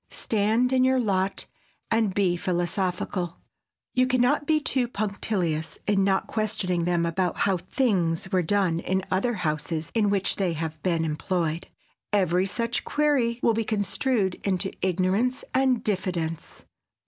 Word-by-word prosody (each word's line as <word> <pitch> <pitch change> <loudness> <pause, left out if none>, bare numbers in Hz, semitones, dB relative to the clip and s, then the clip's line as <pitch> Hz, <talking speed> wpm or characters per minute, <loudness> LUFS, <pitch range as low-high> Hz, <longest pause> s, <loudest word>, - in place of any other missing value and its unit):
Stand 225 +4 +1
in 255 -1 +4
your 260 0 +3
lot 195 -4 0 0.5
and 225 -3 +2
be 185 -2 +2
philosophical. 180 0 -2 0.6
You 255 0 +3
can 255 0 +1
not 285 +4 +2
be 310 -1 +4
too 265 -5 0
punctilious 195 -7 -2
in 200 -1 +2
not 190 0 +2
questioning 205 -6 -1
them 175 -1 +1
about 175 +1 -1
how 195 -2 +2
"things" 185 -3 0
were 185 -2 +3
done 180 -1 +1
in 190 +2 -1
other 225 +6 +1
houses 155 -2 -2
in 215 -3 +2
which 200 -1 0
they 185 -4 0
have 160 0 -4
been 170 -3 +1
employed. 165 +1 -2 0.4
Every 185 -2 +2
such 230 +4 -1
query 270 -6 +1
will 230 - +4
be 225 +1 0
construed 210 0 0
into 190 -1 0
ignorance 190 +7 +1
and 260 -3 +2
diffidence. 180 -5 -3
195 Hz, 145 wpm, -26 LUFS, 175-225 Hz, 0.6 s, in